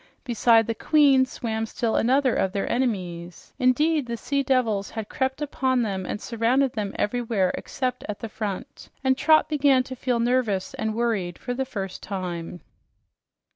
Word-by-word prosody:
Beside 230 -2 +4
the 230 - -1
queen 275 0 +4
swam 225 -3 -3
still 230 0 -1
another 260 +1 +3
of 190 0 0
their 200 - -1
enemies. 180 -8 -3
Indeed, 290 +3 +2
the 235 0 -3
sea 280 +5 -1
devils 245 -7 +1
had 220 -2 -6
crept 265 +2 -1
upon 260 -3 0
them 190 -4 -3
and - - -3
surrounded 240 +4 +1
them 205 -3 -3
everywhere 215 -4 0
except 255 -2 -3
at 205 - -3
the 225 - -6
front, 215 +4 -6
and 265 -1 +3
Trot 310 +3 +4
began 280 -4 +3
to 260 0 -8
feel 245 -1 -1
nervous 230 -5 0
and 220 0 -2
worried 215 -7 -1
for 245 - -4
the 265 +2 -2
first 195 -7 -5
time. 180 -3 -5
235 Hz, 165 wpm, -25 LUFS, 205-260 Hz, -, Beside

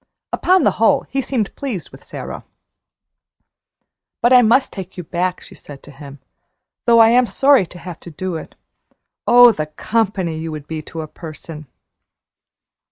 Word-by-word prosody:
Upon 370 +1 +3
the - - +4
whole, 275 +4 +4
he 270 - 0
seemed 240 -6 -3
pleased 235 - -5
with - - -15
Sara. - - -8 1.8
"But 240 +2 +3
I 250 - +8
must 245 +4 +2
take 190 -1 -9
you 180 - -5
back," 180 +2 -2
she - - -14
said 140 -2 -13
to 145 - -13
him, 140 0 -12 0.7
"though 230 -1 +6
I'm 240 +2 +5
sorry 270 -8 +3
to 175 - -13
have 175 -1 -9
to - - -11
do 180 +2 -5
it. 160 - -8 0.7
Oh, 245 0 +8
the 155 -7 -4
company 190 -1 -2
you 160 0 -5
would 150 -2 -7
be 160 0 -5
to 160 +1 -8
a 155 - -7
person!" 155 -1 -10
185 Hz, 165 wpm, -19 LUFS, 160-240 Hz, 1.8 s, I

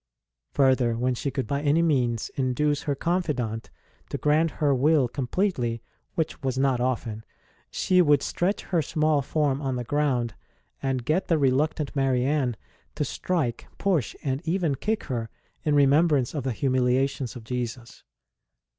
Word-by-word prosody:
Further, 130 -4 +3
when 125 +2 +1
she 130 +3 -2
could 130 -2 -2
by 140 +5 -2
any 150 +3 +3
means 125 -8 +1
induce 140 +3 0
her 145 -2 -1
confidant 135 -10 -1 0.4
to - - -3
grant 155 +2 +2
her 150 -1 0
her - - +4
will 140 +1 +3
completely, 125 - -1 0.3
which 160 -4 -2
was 130 -2 -2
not 135 -2 +2
often, 115 -3 -2 0.5
she 185 -1 +3
would 145 -4 +4
stretch 190 +4 -1
her 175 -3 0
small 155 -1 +1
form 140 0 0
on 135 -2 -1
the 125 - -3
ground 125 -4 0 0.5
and 130 -3 -1
get 160 +8 +1
the 165 - +3
reluctant 145 +2 +1
Marianne 135 -2 +1 0.4
to - - -1
strike, 145 -11 -2
push, 180 - 0
and 135 0 -1
even 170 -3 0
kick 215 - -2
her, 115 -5 -3 0.3
in 150 -1 +2
remembrance 145 -1 +4
of 145 -4 -3
the 130 - 0
humiliations 130 +1 0
of 120 - -8
Jesus. 120 0 -5
135 Hz, 155 wpm, -26 LUFS, 125-150 Hz, 0.5 s, her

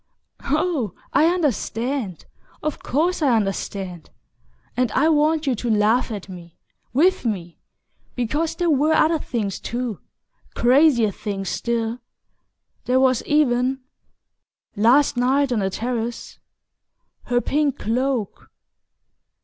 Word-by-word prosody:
"Oh, 295 - 0 0.2
I 300 +4 +5
understand; 260 - -1 0.4
of 305 -1 -2
course 335 +6 0
I 270 -6 +3
understand; 195 -4 -3 0.7
and 250 -3 +1
I 305 +4 +3
want 310 0 +2
you 270 - +2
to 240 +1 -3
laugh 220 +4 +2
at 205 -4 -6
me 175 -3 -11 0.3
with 340 +9 +3
me! 180 -8 -4 0.6
Because 295 +7 -1
there 345 -2 +1
were 300 +2 +3
other 320 0 +3
things 210 -8 -3
too... 240 -4 -4 0.6
crazier 245 -3 +4
things 195 -2 -4
still...There 235 +2 -4
was 260 -2 +3
even 265 -3 +2 0.9
last 245 +6 +4
night 265 +2 +2
on 235 - +1
the 195 -1 0
terrace 235 +3 -4 0.9
her 245 0 +1
pink 285 +2 0
cloak..." 245 -1 -2
245 Hz, 110 wpm, -22 LUFS, 220-290 Hz, 0.9 s, I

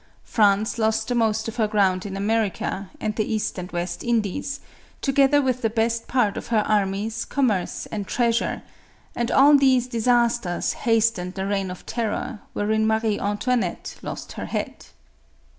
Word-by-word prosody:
France 210 +1 +2
lost 220 0 +1
the - - +1
most 220 -2 +1
of 225 +1 -6
her 220 -2 +2
ground 195 -3 +1
in 195 -1 -5
America 205 -2 -1
and 215 -1 -2
the 215 - -1
East 210 -3 -2
and 180 0 -7
West 175 0 -3
Indies, 235 +4 -1 0.4
together 275 +1 +3
with 255 -1 0
the 225 - +1
best 230 +1 0
part 235 -6 +1
of - - -6
her 220 -2 +2
armies, 210 +2 0
commerce 220 -10 -1
and 205 -3 -4
treasure; 235 -2 0 0.5
and 235 0 -1
all 285 +2 +6
these 260 -3 +4
dis 235 -2 -3
asters 235 -7 +2 0.2
hastened 220 -5 +2
the 190 0 -2
Reign 195 -1 -1
of 180 - -9
Terror, 230 0 -3
wherein 220 +1 +1
Mario 220 -1 +1
Antoinette 205 -1 -1
lost - - -6
her - - -6
head. - - -4
220 Hz, 160 wpm, -23 LUFS, 200-235 Hz, 0.5 s, all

